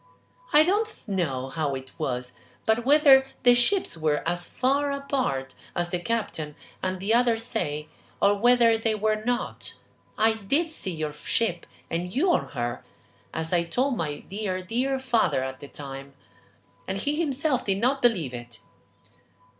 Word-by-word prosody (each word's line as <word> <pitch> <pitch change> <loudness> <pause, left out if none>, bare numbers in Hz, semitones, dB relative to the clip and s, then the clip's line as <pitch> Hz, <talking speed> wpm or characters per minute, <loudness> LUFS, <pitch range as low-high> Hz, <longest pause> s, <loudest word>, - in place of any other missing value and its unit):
"I 300 - +7
don't 415 - -1
know 140 -10 -1
how 145 -2 -1
it 130 0 -8
was, 125 -1 -2 0.3
but 220 +2 +2
whether 275 -2 +7 0.2
the 245 0 +7
ships 245 - +2
were 155 -1 0
as 175 +1 -1
far 280 +3 +1
apart 260 - -2 0.2
as 175 0 -1
the 180 - 0
captain 175 -8 -2 0.3
and 185 0 -2
the 200 +4 +1
others 235 -1 +3
say, 155 -11 -2 0.3
or 200 - +5
whether 235 +1 +5
they 225 -1 +1
were 215 0 0
not, 245 +1 -2 0.4
I 220 +1 +4
did 275 - 0
see 250 - -5
your 155 -3 -3
ship 175 +3 -1 0.2
and 175 +2 -3
you 340 - +2
on - - +1
her, 120 -2 -3 0.5
as 160 +2 -2
I 170 -1 +3
told 250 +11 0
my 150 -7 -3
dear, 190 -2 -4
dear 255 +8 0
father 240 - +1
at 130 0 -5
the 145 - -9
time, 135 -1 -8 0.7
and 195 - -2
he 290 +8 -1
himself 280 -3 +1
did 195 -1 0
not 260 +6 +1
believe 180 - +2
it. 120 -1 -8
210 Hz, 160 wpm, -26 LUFS, 155-250 Hz, 0.7 s, I